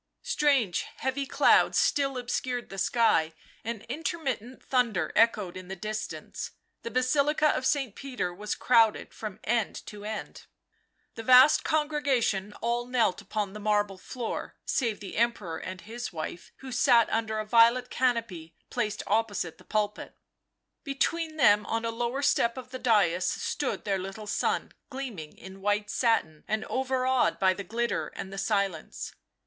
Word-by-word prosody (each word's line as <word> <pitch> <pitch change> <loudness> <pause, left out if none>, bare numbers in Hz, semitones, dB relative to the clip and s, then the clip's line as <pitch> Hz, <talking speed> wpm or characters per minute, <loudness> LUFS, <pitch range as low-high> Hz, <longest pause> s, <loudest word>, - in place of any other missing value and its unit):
Strange, 280 - +2
heavy 265 +1 -2
clouds - - +4
still 275 -2 +2
obscured 245 0 -2
the 195 - -6
sky, 185 -7 +3 0.3
and 225 -1 -4
intermittent 260 -3 -4
thunder 230 -11 +1
echoed 215 -5 +3
in 185 -1 -8
the 190 - -5
distance. 215 +3 -5 0.3
The - - -5
Basilica 285 +5 +2
of 260 - +1
St. 270 -8 0
Peter 250 -10 -4
was 210 +3 -3
crowded 230 -3 +3
from 215 -4 -7
end 230 -2 -1
to 205 -1 -9
end. 215 +1 -6 0.7
The - - -7
vast 255 +4 +7
congregation 285 -10 +1
all 240 +1 -1
knelt 235 -8 +1
upon 205 -1 -3
the 210 - -7
marble 205 -2 0
floor, 240 +4 -5
save 230 -6 -1
the 195 - -7
Emperor 215 -8 0
and 185 0 -7
his 240 +2 -6
wife, 165 +1 -6
who 265 -1 -8
sat 245 -2 +5
under 220 -1 0
a 215 - -2
violet 235 +3 +4
canopy 230 -10 -1 0.2
placed 210 0 -2
opposite 205 -6 -1
the - - -16
pulpit. 210 -1 -2 0.7
Between 315 +3 -1
them, 210 -7 +5
on 225 0 -1
a 230 - 0
lower 240 +4 -2
step 235 -3 +2
of 255 -1 -8
the 255 - -5
dais, 195 -8 +3
stood 285 - -2
their 195 -2 0
little 195 +3 -6
son, 205 - -1 0.2
gleaming 240 - -6
in 190 +2 -11
white 205 +1 0
satin 190 -11 +1
and 215 0 -1
overawed 260 -1 +1
by 190 -1 +3
the 200 - -6
glitter 235 +5 -1
and 190 0 -6
the 195 - -4
silence. 200 -7 -2
225 Hz, 155 wpm, -28 LUFS, 200-255 Hz, 0.7 s, vast